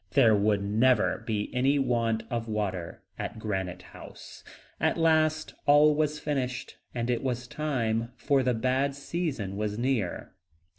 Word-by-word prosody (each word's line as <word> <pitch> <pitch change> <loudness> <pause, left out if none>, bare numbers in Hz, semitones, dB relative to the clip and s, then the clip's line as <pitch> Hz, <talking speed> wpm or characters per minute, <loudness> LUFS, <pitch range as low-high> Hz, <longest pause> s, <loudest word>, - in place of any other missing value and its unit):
There 115 -6 +6
would 100 0 +2
never 110 +3 +2
be 105 -2 -2
any 135 +3 +2
want 115 -4 +1
of 115 -1 -2
water 95 -6 -3 0.2
at - - -4
Granite 95 -4 -3
House. - - -12 0.4
At - - +1
last 155 -1 +2
all 145 +1 +6
was 150 0 0
finished, 130 -4 -3 0.2
and 120 -1 -1
it 120 -2 0
was 125 -2 -2
time, 120 -6 -1
for 140 0 +2
the 125 -2 +1
bad 130 +4 0
season 140 - -3
was 105 0 -2
near. 120 -7 -1
120 Hz, 145 wpm, -28 LUFS, 110-140 Hz, 0.4 s, There